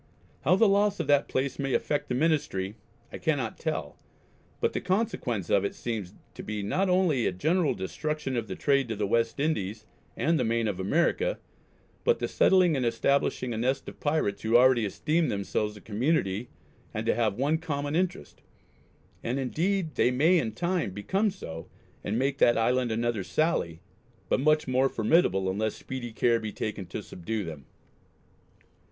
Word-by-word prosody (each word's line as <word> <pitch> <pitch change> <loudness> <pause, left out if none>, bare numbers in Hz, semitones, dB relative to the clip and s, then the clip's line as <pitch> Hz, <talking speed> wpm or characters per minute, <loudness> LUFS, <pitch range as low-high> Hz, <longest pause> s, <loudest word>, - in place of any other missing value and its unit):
How 160 +7 +4
the 220 +3 +5
loss 200 0 +2
of 165 - -1
that 145 0 +3
place 130 +1 -2
may 135 -2 0
affect 145 0 -1
the 125 - 0
Ministry, 125 -10 0 0.4
I - - -6
cannot - - -1
tell, - - -3 0.6
but - - 0
the - - -2
consequence 180 - -1
of 100 - +4
it 100 - -2
seems 110 -6 -4 0.2
to - - -8
be 105 -1 -4
not 185 - 0
only 180 -9 +2
a - - +1
general 160 - +1
destruction 150 +8 -3
of 115 -2 -2
the - - -5
trade 140 -2 +2
to 115 - -3
the 105 0 -1
West 115 +4 0
Indies, 110 -8 -1 0.3
and 165 0 +2
the - - +2
Main 115 0 +1
of 100 -3 -3
America, 170 - +1 0.7
but 475 0 +3
the - - -2
settling 180 -4 +4
and 130 - 0
establishing 120 +1 +1
a 110 - -3
nest 130 +3 0
of - - -9
Pirates 145 -9 0
who 115 +2 +4
already 125 -2 +5
esteem 155 - 0
themselves 105 +1 -2
a - - -13
Community 110 - 0 0.5
and - - -2
to - - +3
have 110 -3 0
one 145 +5 +1
common 145 -3 -3
interest; 175 - -2 0.8
and 125 +3 -1
indeed 165 +6 -1
they - - +3
may 155 +8 +4
in 110 -7 -2
time 175 - -1
become 190 - 0
so, 80 - -8 0.4
and 105 +3 -1
make 135 +2 0
that 120 - +5
Island 125 +1 +1
another 115 -2 -1
Sally 90 - 0 0.5
but - - +2
much 155 +2 +3
more 130 +1 +2
formidable 110 - +2
unless 105 +3 -1
speedy 125 -3 -6
care 115 +1 +2
be 110 -1 -5
taken 105 -4 -4
to 85 - -6
subdue 105 +4 -4
them.... 80 -6 -8
125 Hz, 175 wpm, -28 LUFS, 105-155 Hz, 0.8 s, the